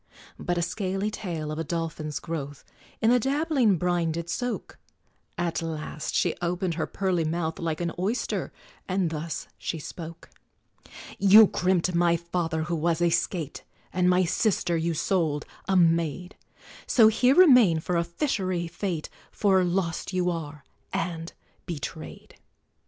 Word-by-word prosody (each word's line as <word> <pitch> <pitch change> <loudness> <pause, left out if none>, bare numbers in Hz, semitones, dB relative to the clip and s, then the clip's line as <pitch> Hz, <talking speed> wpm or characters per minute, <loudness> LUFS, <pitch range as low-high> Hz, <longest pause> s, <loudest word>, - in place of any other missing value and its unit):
But 175 0 -1
a 170 - +1
scaly 195 +3 -2
tail, 165 -8 -4
of 155 - -4
a - - -1
dolphin's 160 -2 -3
growth, 145 -4 -6 0.4
In 225 - +5
the 250 - +5
dabbling 270 - +2
brine 175 -1 0
did 170 +1 -4
soak: 245 -1 -4 0.6
At 170 -2 -1
last 155 -2 -4
she - - +2
opened 175 +1 -1
her 160 0 -2
pearly 185 -4 0
mouth, 160 0 -2
Like 165 -1 -2
an 170 -1 -1
oyster, 210 +7 -1 0.4
and 185 -3 0
thus 160 +1 -4
she 165 - -3
spoke: 165 +2 -9 0.9
"You 205 +2 +9
crimpt 180 -2 +1
my 170 0 +3
father, 170 -1 -2
who 170 0 -2
was 165 +1 +1
a 175 -1 +3
skate, 170 -2 -2 0.3
And 180 0 +3
my 180 0 +4
sister 175 -1 +1
you 165 0 0
sold 155 -3 0 0.2
a 190 -1 +3
maid; 170 0 +1 0.5
So 225 -3 +6
here 250 +5 +4
remain 250 - +7
for 175 +3 -2
a 170 - +2
fish'ry 185 - -1
fate, 170 -2 -3 0.2
For 190 -3 +3
lost 175 0 -1
you 180 -1 +1
are, 150 -3 -6 0.3
and 165 -1 -3 0.4
betrayed!" 155 -7 -7
175 Hz, 145 wpm, -26 LUFS, 165-190 Hz, 0.9 s, You